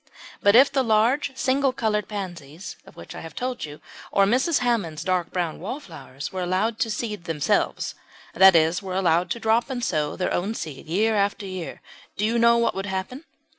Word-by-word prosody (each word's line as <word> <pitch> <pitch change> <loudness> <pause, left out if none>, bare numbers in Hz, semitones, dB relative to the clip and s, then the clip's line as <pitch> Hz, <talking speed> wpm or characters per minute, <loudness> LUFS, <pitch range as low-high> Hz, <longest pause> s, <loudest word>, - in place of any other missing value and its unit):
But 205 +1 +5
if 270 +4 +7
the 275 -1 +2
large 235 +6 +2
single 270 +1 +2
coloured 215 -5 -1
pansies 175 -5 -7
of - - -15
which 85 - -10
I - - -8
have 165 -1 -10
told 250 -4 -3
you, 150 0 -10 0.3
or 195 - +4
Mrs. 260 +9 +2
Hammond's 200 -11 -1
dark 180 -2 0
brown 175 -3 -2
wallflowers, 160 - -7
were 185 - -3
allowed 190 +6 0
to 225 - 0
seed 210 -4 -4
themselves 155 -3 0 0.4
that 190 0 +7
is, 165 +2 +3
were 190 -2 -5
allowed 175 -1 +2
to 235 - -2
drop 225 +3 +1
and 250 -2 -3
sow 150 -1 -1
their 185 - -1
own 200 +5 -1
seed 155 -4 -7
year 210 +7 +1
after 200 0 0
year 185 -3 -6 0.3
do 210 - +1
you 230 +2 +1
know 235 0 +5
what 235 - +2
would 195 +1 -4
happen? 195 - -4
200 Hz, 195 wpm, -24 LUFS, 175-235 Hz, 0.4 s, if